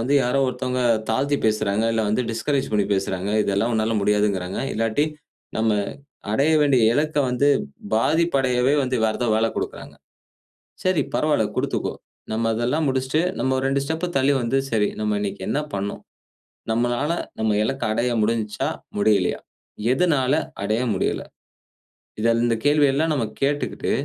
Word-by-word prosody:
வந்து 130 +5 +1
யாரோ 125 +3 +1
ஒருத்தவுங்க 125 0 -2 0.3
தாழ்த்தி 140 +5 +1
பேசுறாங்க, 110 0 +1
இல்ல 110 -1 +1
வந்து 110 +4 +1
டிஸ்கரேஜ் 135 +4 -1
பண்ணி 105 -2 +2
பேசுறாங்க, 95 0 -2
இதெல்லாம் 100 +4 0
உன்னால 110 0 +1
முடியாதுகிறாங்க, 100 -3 0 0.2
இல்லாட்டி 115 +6 +1 0.5
நம்ம 110 0 +2 0.6
அடைய 140 +7 +3
வேண்டிய 135 -5 +3
இலக்க 150 +2 0
வந்து, 125 +3 +2 0.5
பாதிப்பு 160 +8 +2
அடையவே 125 +1 +2
வந்து 130 -1 -1
வேற 110 - 0
ஏதாவது 120 -3 +2
வேல 110 +1 +2
கொடுக்கிறாங்க. - - -5 0.9
சரி 185 -3 +3
பரவாயில்ல 150 -7 +2
குடுத்துக்கோ. - - -1 0.4
நம்ம 110 +1 -1
அதெல்லாம் 125 +8 0
முடிச்சிட்டு, 130 +3 0 0.2
நம்ம 130 0 +1
2 135 +1 +1
ஸ்டெப் 160 +4 -2
தள்ளி 135 +1 +3
வந்து 120 +3 0
சரி, 105 -2 +2
நம்ம 105 -1 0
இன்னக்கி 100 -2 -4
என்ன 145 - +1
பண்ணோம்? 100 +1 -3 0.7
நம்மளால 120 +6 0 0.3
நம்ம 110 0 +1
இலக்க 135 +4 -2
அடைய 120 +3 0
முடிஞ்சா? 110 -2 -1 0.3
முடியலயா? 100 -3 +2 0.5
எதனால 135 -4 +2 0.3
அடைய 110 +4 0
முடியல? 95 - -1 1.0
இத 115 +1 +3
இந்த 115 - +2
கேள்வி 145 0 +5
எல்லாம் 155 +4 +1
நம்ம 130 -6 0 0.2
கேட்டுக்கிட்டு, 145 +1 -1
120 Hz, 140 wpm, -23 LUFS, 110-140 Hz, 1.0 s, கேள்வி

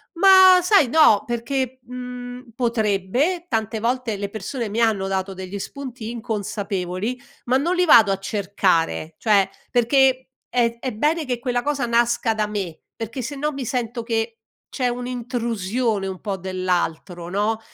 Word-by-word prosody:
Ma, 375 0 +8
sai, 360 - +4
no 235 -8 +5
perché, 255 +2 -2
mhmm, 250 0 -8
potrebbe, 235 - 0
tante 220 - -2
volte 235 -1 -1
le 200 0 -4
persone 220 +4 -4
mi 215 +3 -2
hanno 215 -4 +2
dato 195 0 -2
degli 190 +1 -6
spunti 245 +2 -7
inconsapevoli, 210 -2 -3 0.3
ma 250 - +2
non 335 +7 0
li 360 0 +3
vado 225 - +7
a 195 - 0
cercare, 185 -5 0
cioè, 205 -4 +3 0.2
perché 260 +2 +3 0.2
è 235 -1 +1
è 260 +1 -3
bene 300 +9 0
che 250 -2 -2
quella 245 0 -1
cosa 285 -3 -1
nasca 235 -1 +2
da 215 -1 0
me, 200 -6 -5
perché 225 +3 -5
sennò 290 +4 -3
mi 275 -2 -5
sento 235 -1 -3
che 225 0 -2 0.3
c'è 250 -3 -1
un'intrusione 240 -4 -2
un 190 -1 -6
po' 205 -2 -3
dell'altro, 180 -1 -2
no? 210 +4 0
230 Hz, 150 wpm, -22 LUFS, 200-255 Hz, 0.3 s, Ma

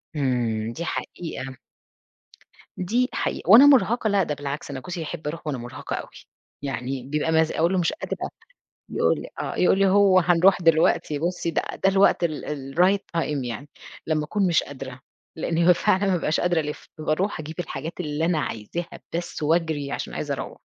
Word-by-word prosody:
إمم، 120 -5 0
دي 170 +5 -5
حقيقة، 135 -6 -5 1.2
دي 240 +8 +1
حقيقة - - -3
وأنا 235 +7 +10
مُرهقة 240 -4 +4
لأ، 200 -2 +3
ده 150 - -2
بالعكس 140 0 -5
أنا 135 - -4
جوزي 175 +4 -6
يحب 155 -1 -6
أروح 160 +1 -5
وأنا 145 -3 -1
مُرهقة 120 +1 -6
أوي، - - -6 0.5
يعني 130 -1 -3
بيبقى 150 +4 -1
مز 160 0 +3
أقول 170 +4 +1
له 185 - +2
مش 170 - +1
قادرة 310 - -4 0.6
يقول - - +1
لي - - -9
آه، - - -3
يقول 185 +1 +4
لي: 195 - +5
"هو 195 -1 +5
هنروح 180 +2 +4
دلوقتي، 160 -2 +3
بصّي 170 0 -1
بقى - - -2
ده 195 - +3
الوقت 195 -2 +4
ال 145 -4 -3
الright 185 +4 +4 0.2
time 145 -5 -2
يعني." 125 +5 -6 0.4
لمّا 155 -1 +1
أكون 195 +5 0
مش 170 - +3
قادرة، 130 -2 -8 0.4
لإن 165 +1 -2
هو 180 - +8
فعلًا 200 +2 +2
ما 195 - +2
بابقاش 160 -2 0
قادرة 175 -1 +2
الِفّ، 150 -1 -5
باروح 155 +5 -1
أجيب 155 +2 -7
الحاجات 160 -1 -4
اللي 155 -1 -1
أنا 170 -3 +1
عايزاها 150 +10 -5 0.2
بس 170 -2 -4
واجري، 155 -3 0
عشان - - -4
عايزة - - -2
أروّح، - - -6
160 Hz, 180 wpm, -24 LUFS, 145-180 Hz, 1.2 s, وأنا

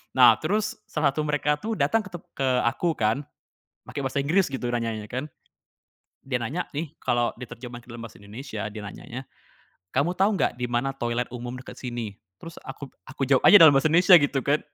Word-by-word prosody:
Nah, - - +7
terus 215 +1 -1
salah 150 -2 +1
satu 155 +3 -2
mereka 150 0 0
tuh 225 +5 -3
datang 155 +8 +2
ke 170 -6 -5 0.2
aku 160 +8 0
kan, 115 +6 0 0.6
make - - -9
bahasa 140 0 -1
Inggris 175 +7 +2
gitu 135 -2 -5
nanya 115 -2 -1
nya 105 -1 -8
kan. 130 +3 -3 1.0
Dia 130 -2 -2
nanya 135 +10 -2
nih, 150 0 -5
kalo 120 -1 +1
diterjemah 120 0 -9
ke 120 - -14
dalam 120 0 -8
Bahasa - - -18
Indonesia, 110 +2 -7
dia 105 0 -7
nanya 100 - -9
nya 125 +2 -6 0.8
"Kamu 145 +6 +2
tau 190 +3 +2
nggak 125 - -1
di 125 - -1
mana 120 +3 0
toilet 120 -2 -2
umum 125 0 -6
deket 125 - -11
sini," 120 -4 -4 0.2
terus 165 +8 -11
aku 140 - -9 0.2
aku 135 0 -3
jawab 135 0 +2
aja - - +10
dalam 160 -6 +9
bahasa 135 +3 +3
Indonesia 175 +3 +7
gitu 140 -2 0
kan, 145 +2 +2
135 Hz, 195 wpm, -25 LUFS, 120-150 Hz, 1.0 s, aja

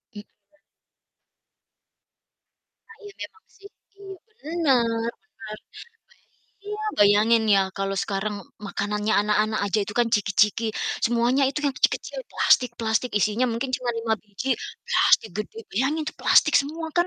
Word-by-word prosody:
Mhm. 205 - -7 2.7
Ah 455 - -15
iya 410 -1 -11
memang 440 -1 -13
sih. 400 0 -15 0.3
Iya, 400 - -15 0.2
benar 270 - 0 0.2
benar. 215 - -10 0.8
Ba - - -40 0.2
iya, 420 +1 -5 0.2
bayangin 215 +3 +4
ya, 195 - +4
kalau 195 0 -2
sekarang 205 +1 -3 0.3
makanannya 210 +2 -2
anak-anak 215 +1 +1
aja 205 +2 0
itu 205 - -8
kan 235 - +2
ciki-ciki, 210 +2 +1 0.4
semuanya 240 +4 +2
itu 280 - -3
yang 280 -2 0
kecil-kecil - - -1
plastik-plastik 235 -1 +1
isinya 215 +5 +1
mungkin 255 +3 -3
cuma 245 -1 -3
5 230 -1 0
biji, 210 +5 -7 0.4
plastik 220 - +3
gede. 215 +1 -6
Bayangin 275 +9 0
itu - - -5
plastik 305 - +4
semua 320 +3 -6
kan. 345 +1 +3
230 Hz, 130 wpm, -24 LUFS, 210-280 Hz, 2.7 s, bayangin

